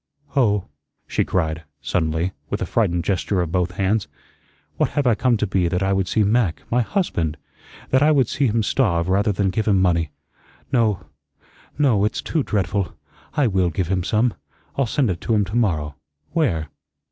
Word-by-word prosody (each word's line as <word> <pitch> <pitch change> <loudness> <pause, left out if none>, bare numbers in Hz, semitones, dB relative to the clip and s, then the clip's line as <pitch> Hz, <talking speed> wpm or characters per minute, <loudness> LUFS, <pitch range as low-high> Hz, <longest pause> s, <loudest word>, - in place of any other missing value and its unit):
Oh," 105 -8 +3 0.4
she - - 0
cried, 80 -3 -1 0.2
suddenly, 80 +4 0 0.2
with - - -2
a - - -1
frightened 85 0 +1
gesture 95 0 0
of 85 -3 -1
both 90 0 0
hands, 100 +2 0 0.7
"what - - +2
have 145 - +2
I 120 - +5
come 120 +2 +2
to 105 - 0
be 95 -3 +1
that 90 +2 0
I 95 0 +2
would 95 -1 0
see 110 - +2
Mac 105 -4 +1
my 125 +1 +3
husband 85 - -1 0.5
that 130 - +4
I 150 - +5
would 140 -6 +4
see 140 +2 +1
him 115 0 +1
starve 90 -8 +1
rather 100 +3 +2
than 100 -1 0
give 110 +3 -1
him 100 -3 +4
money? 85 -4 +2 0.6
No, 110 -5 +1 0.7
no. 130 -9 +3
It's 105 - 0
too 160 - 0
dreadful. 100 - -1 0.4
I 145 -3 +3
WILL 95 -5 +2
give 85 +1 -2
him 95 -2 0
some. 110 +5 +2 0.4
I'll 135 -3 +1
send 125 -2 +1
it 85 -1 -5
to 115 - +1
him 105 -1 +2
to 100 +4 -6
morrow. 80 -11 +1 0.4
Where? 85 - 0
100 Hz, 185 wpm, -22 LUFS, 90-115 Hz, 0.7 s, I